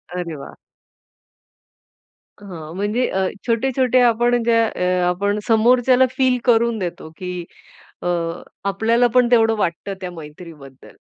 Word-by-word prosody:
अरे 170 -3 -4
वाह! 140 - -11 1.9
हां. 165 -5 -9
म्हणजे 210 +6 -1
अ, 190 0 0 0.2
छोटे-छोटे 255 +2 +1
आपण 240 0 +3
ज्या 230 -1 +3
अ, 180 - -4 0.3
आपण 200 +3 -1
समोरच्याला 245 +3 +4
फील 260 -2 +3
करून 235 -1 +3
देतो, 175 -3 -5
की 180 -1 -6 0.6
अ, - - -5 0.6
आपल्याला 230 +5 +2
पण 250 -1 +4
तेवढं 225 -2 +4
वाटतं 195 0 -2
त्या 180 - -5
मैत्रीबद्दल. 150 -4 -12
220 Hz, 120 wpm, -20 LUFS, 180-240 Hz, 1.9 s, समोरच्याला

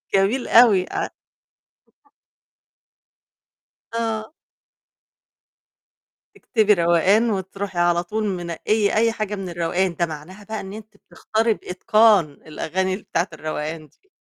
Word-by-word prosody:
جميل 205 +7 +1
أوي 220 -6 +6
ع - - -2 2.9
آه. 225 +1 -2 2.0
تكتبي 215 -2 +2
روقان 185 +6 +3
وتروحي 195 -1 -4
على 175 0 +2
طول 215 +5 -3
منقيّة 195 +3 -1
أي 230 +1 +3
حاجة 215 -2 -3
من 195 -2 -5
الروقان، 175 +1 -1
ده 170 +1 0
معناها 165 +6 -10
بقى 220 +1 -5
إن 190 - -8
أنتِ 215 0 -11
بتختاري 220 +2 -1
بإتقان 215 +1 +3
الأغاني 185 +6 -3
بتاعة 190 -2 -2
الروقان 155 0 -5
دي. 395 - -36
195 Hz, 105 wpm, -22 LUFS, 175-215 Hz, 2.9 s, أوي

